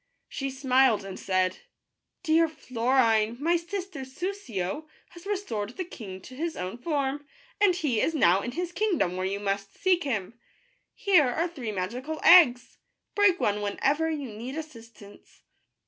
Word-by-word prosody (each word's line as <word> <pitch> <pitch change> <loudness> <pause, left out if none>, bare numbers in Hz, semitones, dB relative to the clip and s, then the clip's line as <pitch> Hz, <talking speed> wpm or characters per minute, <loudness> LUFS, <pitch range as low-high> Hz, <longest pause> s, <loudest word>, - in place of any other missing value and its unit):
She 275 -1 -4
smiled, 260 -5 +2
and 195 -1 -7
said: 185 -1 0 0.3
" - - -56
Dear 330 -1 +4
Florine, 235 -5 +1
my 335 +4 +2
sister 360 -1 -4
Soussio 265 - -4 0.2
has 345 +2 -13
restored 245 - -3
the 370 - -2
king 195 - -9
to 255 - -12
his 325 +4 -3
own 185 +6 -5
form, 285 0 -2 0.3
and 390 -4 +5
he 275 -11 0
is 325 - 0
now 190 - +4
in 245 - -5
his 350 +3 -3
kingdom, 355 - 0
where 185 0 -1
you 200 +1 -3
must 200 -1 -3
seek 375 -3 +2
him. 230 -3 -3 0.6
Here 380 - +4
are 330 +8 0
three 260 -10 -6
magical 245 +11 -4
eggs. 290 -9 +6 0.3
Break 400 -3 +4
one 205 0 0
when 205 -1 -3
ever 300 +4 +2
you 290 -5 -4
need 235 +6 -7
assistance." 230 -9 -12
265 Hz, 160 wpm, -27 LUFS, 210-335 Hz, 0.6 s, eggs